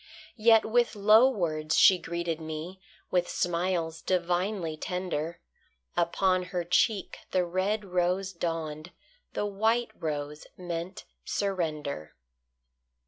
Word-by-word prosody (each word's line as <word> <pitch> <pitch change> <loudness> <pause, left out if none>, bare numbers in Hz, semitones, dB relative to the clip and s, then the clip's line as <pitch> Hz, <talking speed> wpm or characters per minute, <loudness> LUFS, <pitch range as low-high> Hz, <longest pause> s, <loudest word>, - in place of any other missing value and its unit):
Yet 225 0 +6
with 235 +1 +2
low 215 +5 +6
words 155 -9 -1
she 185 -1 +7
greeted 170 -1 -3
me, 160 +4 -6 0.3
With 180 -1 +1
smiles 170 -2 -1
divinely 180 -1 0
tender; 170 -1 -3 0.6
Upon 185 +2 +2
her 180 -1 -3
cheek 180 +4 +1
the 185 -1 +1
red 195 +4 -1
rose 180 +1 0
dawned, 165 -2 -4 0.4
The - - -1
white 220 +4 +1
rose 150 -1 -4
meant 175 +1 -5 0.2
surrender. 155 - -3
180 Hz, 105 wpm, -28 LUFS, 165-195 Hz, 0.6 s, she